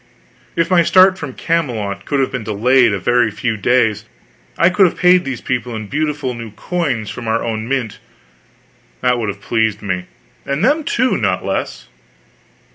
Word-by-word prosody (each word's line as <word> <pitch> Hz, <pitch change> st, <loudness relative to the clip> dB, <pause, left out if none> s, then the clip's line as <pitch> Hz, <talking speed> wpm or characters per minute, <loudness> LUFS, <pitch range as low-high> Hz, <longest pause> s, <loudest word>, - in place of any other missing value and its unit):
If 165 Hz, +2 st, 0 dB
my 180 Hz, -2 st, +5 dB
start 185 Hz, +2 st, +5 dB
from 140 Hz, -4 st, -6 dB
Camelot 115 Hz, -, -2 dB
could 140 Hz, -, -1 dB
have 130 Hz, -, -1 dB
been 125 Hz, -3 st, -4 dB
delayed 120 Hz, +3 st, +3 dB
a 100 Hz, -, -1 dB
very 120 Hz, +4 st, +2 dB
few 110 Hz, +2 st, -2 dB
days 110 Hz, 0 st, +1 dB, 0.5 s
I 170 Hz, +2 st, +4 dB
could 190 Hz, 0 st, +5 dB
have -, -, -5 dB
paid 180 Hz, 0 st, +5 dB
these 130 Hz, -3 st, -4 dB
people 125 Hz, -2 st, -3 dB
in 110 Hz, -1 st, -5 dB
beautiful 150 Hz, +1 st, -2 dB
new 115 Hz, -1 st, -7 dB
coins 130 Hz, -, -3 dB
from 120 Hz, -, -7 dB
our 115 Hz, +1 st, 0 dB
own 110 Hz, -1 st, -3 dB
mint, 125 Hz, -5 st, -2 dB, 1.0 s
and 125 Hz, -, +4 dB
that 125 Hz, -, 0 dB
would 110 Hz, -3 st, -2 dB
have 100 Hz, 0 st, -6 dB
pleased 110 Hz, -2 st, 0 dB
me; 90 Hz, -2 st, -3 dB, 0.4 s
and 140 Hz, +7 st, -1 dB
them, 300 Hz, +4 st, +2 dB
too, 255 Hz, +2 st, +1 dB
not -, -, -1 dB
less. -, -, -3 dB
125 Hz, 180 wpm, -17 LUFS, 110-155 Hz, 1.0 s, my